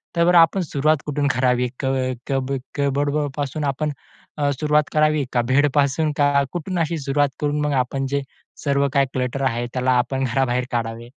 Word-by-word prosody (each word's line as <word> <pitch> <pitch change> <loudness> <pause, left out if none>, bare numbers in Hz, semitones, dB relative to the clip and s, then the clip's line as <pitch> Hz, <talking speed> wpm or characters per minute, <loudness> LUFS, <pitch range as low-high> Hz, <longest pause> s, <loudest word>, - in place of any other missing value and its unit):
तर 170 +1 +3
आपण 170 +3 +5
सुरुवात 155 -1 +1
कुठून? 145 -1 -1
करावी? 125 0 +1
क - - -3 0.4
कब 135 -1 -1 0.3
कपबर्डपासून 145 +1 -1
अ, 145 - 0
आपण 150 +3 -1 0.7
सुरुवात 150 0 +3
करावी 155 -1 +3
का 120 - +3
बेडपासून? 145 +2 +2
का 145 -1 +3
कुठून 175 +1 -3
अशी 165 0 0
सुरुवात 140 +1 +1
करून 150 0 0
मग 150 -1 0
आपण 135 +2 -4
जे 140 0 0 0.4
सर्व 140 -1 +2
काही 140 -1 +4
क्लटर 130 +1 -2
आहे, 120 -2 0
त्याला 130 0 +1
आपण 135 +2 -1
घराबाहेर 125 0 0
काढावे? 115 0 -3
140 Hz, 160 wpm, -22 LUFS, 130-150 Hz, 0.7 s, आपण